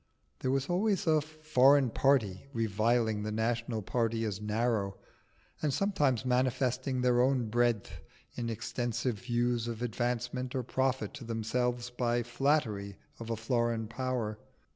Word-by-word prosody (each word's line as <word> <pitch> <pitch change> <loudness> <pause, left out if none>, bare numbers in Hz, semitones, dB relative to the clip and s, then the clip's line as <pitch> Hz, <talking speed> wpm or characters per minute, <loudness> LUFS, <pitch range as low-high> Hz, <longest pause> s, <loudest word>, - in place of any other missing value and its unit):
There 130 - -1
was 135 +1 +1
always 195 +2 +1
a 155 -2 +4
Foreign 145 -4 +3
party 125 -7 +2
reviling 110 0 +1
the 105 +1 -3
National 115 0 -1
party 115 +1 0
as 105 -2 -3
narrow, 105 -2 0 0.6
and 150 - +1
sometimes 145 - +1
manifesting 130 +1 +1
their 125 -1 +4
own 125 -3 +2
breadth 120 -2 0 0.3
in 120 -1 -3
extensive 115 0 -2
views 120 0 0
of 115 0 -4
advancement 125 +2 -2
or 130 - 0
profit 130 +1 -1
to 135 - -8
themselves 120 +2 -1
by 120 -1 0
flattery 120 -6 0 0.2
of 115 0 -7
a 115 - 0
foreign 115 -1 0
power. 120 -3 -2
120 Hz, 135 wpm, -31 LUFS, 115-130 Hz, 0.6 s, a